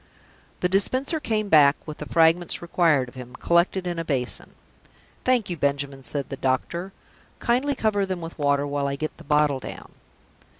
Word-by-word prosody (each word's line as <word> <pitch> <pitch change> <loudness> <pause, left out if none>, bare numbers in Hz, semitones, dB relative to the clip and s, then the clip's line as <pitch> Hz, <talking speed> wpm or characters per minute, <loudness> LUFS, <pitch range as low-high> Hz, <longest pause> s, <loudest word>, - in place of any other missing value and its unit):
The 180 - +3
Dispenser 255 - +1
came 215 -6 -1
back, 145 -5 +6
with 155 -1 -8
the - - -6
fragments 165 +1 +3
required 165 -6 +2
of 120 - -13
him, 125 -2 -10
collected 175 +2 +1
in 175 -1 -3
a - - -2
basin. 135 -6 -3 0.7
"Thank 250 -5 +2
you, 175 - -3
Benjamin," 140 -2 -1
said 135 +3 -2
the 135 - -5
doctor. 160 +8 -1 0.5
"Kindly 260 +4 +1
cover 215 -4 +1
them 190 -2 -3
with 165 -1 -8
water, 140 -1 +2
while 145 0 -1
I 140 - -2
get 155 +2 -4
the - - -13
bottle 150 -1 +2
down." - - -9
160 Hz, 175 wpm, -24 LUFS, 140-190 Hz, 0.7 s, back